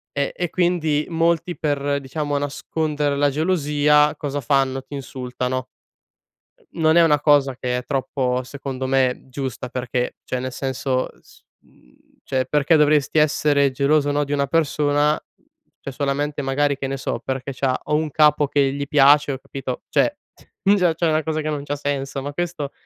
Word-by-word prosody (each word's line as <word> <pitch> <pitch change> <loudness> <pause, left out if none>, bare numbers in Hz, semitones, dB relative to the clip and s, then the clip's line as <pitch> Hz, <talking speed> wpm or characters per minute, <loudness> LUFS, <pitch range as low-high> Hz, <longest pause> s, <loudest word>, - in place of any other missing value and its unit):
eh 140 0 0
e 175 -1 -2
quindi 165 -4 +1
molti, 170 +1 0
per 145 -2 -1
diciamo 145 +2 -3
nascondere 145 +1 -2
la 145 0 +2
gelosia 150 -2 +2
cosa 145 -1 -4
fanno, 135 0 +1
ti - - -13
insultano. 130 -1 -4 1.1
Non 160 0 +3
è 170 - +7
una 150 -3 +3
cosa 145 -3 +3
che 125 -1 -2
è 125 - -6
troppo, 130 -2 -1
secondo 130 0 -5
me, 130 -1 +1
giusta 130 -2 -5
perché, 125 0 -3
cioè 130 - -3
nel 130 0 -4
senso 130 0 -2
s - - -21 0.2
mhmm, - - -26 0.3
cioè 130 -1 0
perché 150 +3 +2
dovresti 150 0 +3
essere 145 -2 +3
geloso 145 +2 +2
no, 145 0 +1
di 145 - -6
una 140 -1 +1
persona, 150 -1 +2 0.6
cioè 140 - -7
solamente 145 +2 -2
magari 140 +1 +1
che 135 0 -4
ne 135 - -3
so 135 - -3
perché 135 +1 -3
c'ha 130 0 0
o 150 - -1
un 155 0 0
capo 150 -1 +4
che 140 -1 +2
gli 140 0 -3
piace 145 0 +5
o 135 - -4
capito, 135 -1 -6
cioè 295 - +2 0.6
già 180 -4 +3
c'è 170 +1 0
una 155 0 +2
cosa 155 0 -2
che 155 - -3
non 145 -2 -3
c'ha 145 0 -3
senso, 140 -1 -3
ma 145 +1 -5
questo 165 -3 -3
145 Hz, 170 wpm, -22 LUFS, 135-150 Hz, 1.1 s, è